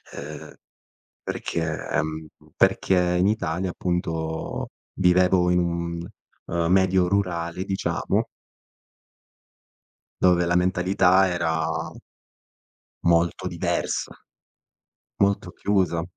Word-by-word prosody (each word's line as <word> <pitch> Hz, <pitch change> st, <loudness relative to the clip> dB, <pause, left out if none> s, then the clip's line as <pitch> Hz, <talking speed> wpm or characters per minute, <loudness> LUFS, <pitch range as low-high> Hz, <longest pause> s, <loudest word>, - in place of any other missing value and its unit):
ehm, 75 Hz, +1 st, -8 dB, 0.7 s
perché, 80 Hz, -2 st, -3 dB
ehm, 80 Hz, -1 st, -2 dB, 0.3 s
perché 90 Hz, -2 st, +2 dB
in 90 Hz, -, +3 dB
Italia, 95 Hz, -3 st, -1 dB
appunto, 80 Hz, -3 st, -3 dB, 0.3 s
vivevo 90 Hz, 0 st, +4 dB
in 90 Hz, -, +3 dB
un, 85 Hz, 0 st, -2 dB, 0.4 s
ehm, 85 Hz, 0 st, 0 dB
medio 95 Hz, -1 st, +3 dB
rurale, 90 Hz, -2 st, -1 dB
diciamo 95 Hz, -1 st, -1 dB, 1.9 s
dove 90 Hz, -1 st, +4 dB
la 85 Hz, +1 st, +1 dB
mentalità 95 Hz, +1 st, +3 dB
era 80 Hz, -2 st, 0 dB, 1.4 s
molto 85 Hz, 0 st, +2 dB
diversa -, -, -2 dB, 1.0 s
molto 100 Hz, 0 st, +1 dB
chiusa. 95 Hz, -5 st, 0 dB
90 Hz, 80 wpm, -24 LUFS, 85-95 Hz, 1.9 s, vivevo